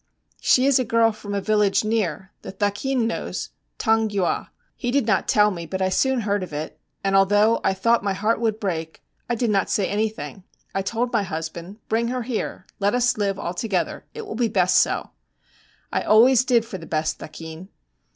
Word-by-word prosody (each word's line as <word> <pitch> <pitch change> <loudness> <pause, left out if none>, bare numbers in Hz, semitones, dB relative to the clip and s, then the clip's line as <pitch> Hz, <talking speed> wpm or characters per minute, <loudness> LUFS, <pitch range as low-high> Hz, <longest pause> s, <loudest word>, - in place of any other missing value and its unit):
'She 255 - +4
is 275 -1 +4
a - - +2
girl 230 0 +3
from 205 -1 -6
a - - +1
village 210 -1 +2
near; 215 -4 -1
the - - -7
thakin 210 +6 0
knows, 230 - -3 0.3
Taungywa. 220 -4 +1 0.3
He 245 - -3
did 270 -1 +2
not 210 -4 +1
tell 210 -1 +4
me, 170 -3 -6
but 190 +3 -4
I 190 0 +1
soon 265 +6 +1
heard 205 -1 0
of 180 -3 -6
it; 150 +1 -5 0.2
and 195 0 +1
although 205 +3 +4
I 190 - +2
thought 230 +4 +2
my 200 -1 0
heart 215 +4 0
would 220 -2 0
break, 165 -6 -4 0.3
I 240 - +1
did 235 -1 0
not 195 -2 +1
say 200 - +1
anything. 215 -1 -3 0.3
I 195 - 0
told 235 +5 -2
my 230 - +3
husband, 170 +2 -6
"Bring 230 +1 +1
her 250 0 -2
here, 230 -2 -4
let 205 +3 +2
us 245 0 +2
live 200 -2 0
all 180 -3 -4
together; 190 -1 -2
it 450 -1 -6
will - - -6
be 235 0 +1
best 185 -4 +3
so." - - 0 0.8
I - - +1
always 245 +4 +5
did 235 -3 +3
for 190 -5 -7
the 165 - -10
best, 155 0 -1
thakin. 160 +3 -9
210 Hz, 200 wpm, -23 LUFS, 190-230 Hz, 0.8 s, always